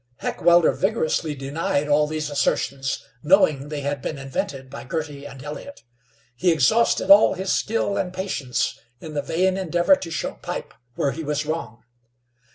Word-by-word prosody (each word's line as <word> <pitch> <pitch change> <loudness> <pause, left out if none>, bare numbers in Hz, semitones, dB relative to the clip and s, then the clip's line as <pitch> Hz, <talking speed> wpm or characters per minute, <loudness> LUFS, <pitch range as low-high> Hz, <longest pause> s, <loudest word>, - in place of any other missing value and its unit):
Heckewelder 175 -1 +3
vigorously 165 -6 0
denied 140 +1 -1
all 150 +1 +3
these 155 -1 -3
assertions, 140 -1 -1 0.2
knowing 150 -5 +3
they 150 -1 -4
had 140 -1 -2
been 150 - -4
invented 135 0 -4
by 140 +2 -9
Girty 145 -1 -5
and 135 -2 -11
Elliott. 150 - -8 0.5
He 175 +7 +2
exhausted 165 - +3
all 200 0 +7
his 190 +1 -1
skill 210 -2 0
and 180 - -1
patience 185 -9 -2 0.2
in 155 +3 -9
the 145 - -1
vain 185 +6 +1
endeavor 175 - +3
to 185 -11 -7
show 155 -4 -4
Pipe - - -5 0.2
where 140 - 0
he 160 +6 -6
was 150 0 -1
wrong. 155 -7 -4
150 Hz, 160 wpm, -23 LUFS, 140-180 Hz, 0.5 s, all